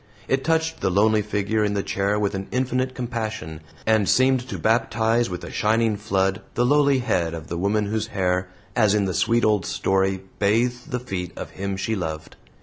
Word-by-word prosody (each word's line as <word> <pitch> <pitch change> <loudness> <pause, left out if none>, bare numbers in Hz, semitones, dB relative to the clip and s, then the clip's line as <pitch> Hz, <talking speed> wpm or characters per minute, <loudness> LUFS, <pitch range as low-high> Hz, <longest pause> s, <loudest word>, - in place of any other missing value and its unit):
It 135 0 +1
touched 160 0 0
the - - +1
lonely 105 +3 +3
figure 105 +1 0
in 105 -1 0
the 100 - 0
chair 100 +1 0
with 105 -1 0
an 95 0 -4
infinite 130 0 -1
compassion, 110 -10 -4 0.2
and 110 -3 +3
seemed 130 0 +4
to - - -4
baptize 115 0 +1
with 90 -1 -5
a - - -7
shining 110 0 +2
flood 100 -1 0
the 120 - +2
lowly 140 0 +4
head 85 -10 0
of 80 -1 -9
the 85 - -3
woman 105 +3 +1
whose 110 +1 -2
hair, 90 -1 0 0.3
as 110 -4 +4
in 105 -2 +2
the 95 - -2
sweet 115 +4 +2
old 105 -4 +2
story, 95 +1 0 0.2
bathed 120 +6 +1
the 125 -3 -2
feet 95 -7 -5
of - - -6
him 100 0 -4
she 110 +3 -1
loved. 80 -4 -5
105 Hz, 195 wpm, -23 LUFS, 95-120 Hz, 0.3 s, seemed